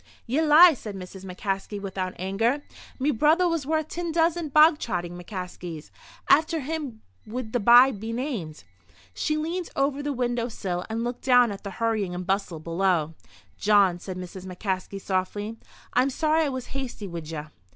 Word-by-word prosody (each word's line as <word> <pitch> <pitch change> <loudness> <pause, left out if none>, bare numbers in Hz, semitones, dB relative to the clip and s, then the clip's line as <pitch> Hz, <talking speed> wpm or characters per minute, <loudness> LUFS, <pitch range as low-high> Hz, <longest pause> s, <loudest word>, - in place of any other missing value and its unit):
"Ye 260 +7 +1
lie!" 320 +3 +8
said 215 -6 -7
Mrs. 190 0 -9
McCaskey, 195 +2 -3
without 190 -2 -4
anger. 225 +10 0 0.3
"Me 280 +3 +1
brother 310 +8 +3
was 330 -5 -1
worth 315 0 0
tin 340 -1 -3
dozen 330 0 +1
bog 305 +2 +6
trotting 175 -6 -3
McCaskeys. 180 -3 -7 0.4
After 315 +1 +4
him 280 -6 -5 0.2
would 225 0 -5
the 245 - +2
bye 240 +5 +7
be 220 0 -6
named." 230 - -4 0.5
She 305 -1 -1
leaned 335 +3 -3
over 275 +1 0
the 290 0 -2
window 240 -2 -1
sill 180 -5 -4
and 225 +1 -2
looked 240 0 -4
down 245 -3 +5
at 200 - -8
the 200 - -5
hurrying 215 -6 0
and 180 0 -5
bustle 190 -3 -1
below. 165 -1 0 0.5
"Jawn," 200 -4 +4
said 185 0 -7
Mrs. 185 +1 -8
McCaskey, 190 +1 -3
softly, 205 +4 -2 0.3
"I'm 255 +2 +3
sorry 310 +3 +2
I - - 0
was 260 -2 -4
hasty 260 -6 -5
wid 170 -3 -7
ye." 155 -2 -4
225 Hz, 170 wpm, -26 LUFS, 185-285 Hz, 0.5 s, lie